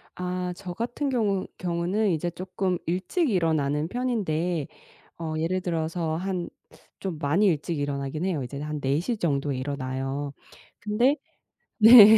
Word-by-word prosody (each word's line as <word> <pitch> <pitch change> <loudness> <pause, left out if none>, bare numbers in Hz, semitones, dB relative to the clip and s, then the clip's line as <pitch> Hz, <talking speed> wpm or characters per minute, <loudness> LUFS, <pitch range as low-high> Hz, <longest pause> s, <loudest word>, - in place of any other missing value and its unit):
아 180 0 -2
저 180 -2 -6
같은 240 +7 -2
경우 210 -7 +1
경우는 180 +4 0
이제 170 0 0
쪼끔 185 +1 -1
일찍 190 - 0
일어나는 155 -6 +1
편인데 180 - 0 0.5
어 160 -2 -3
예를 175 +4 0
들어서 165 -1 -1
한 185 -1 -2 0.5
좀 185 -5 -3
많이 155 +8 +2
일찍 160 -2 0
일어나긴 145 +3 -2
해요. 170 -8 0
이제는 140 +4 -5
한 150 0 -3
4:00 155 - 0
정도에 145 -6 0
일어나요. 135 +1 -3 0.5
근데 215 +7 +3 0.6
네. 220 -1 +11
175 Hz, 265 characters per minute, -27 LUFS, 150-195 Hz, 0.6 s, 네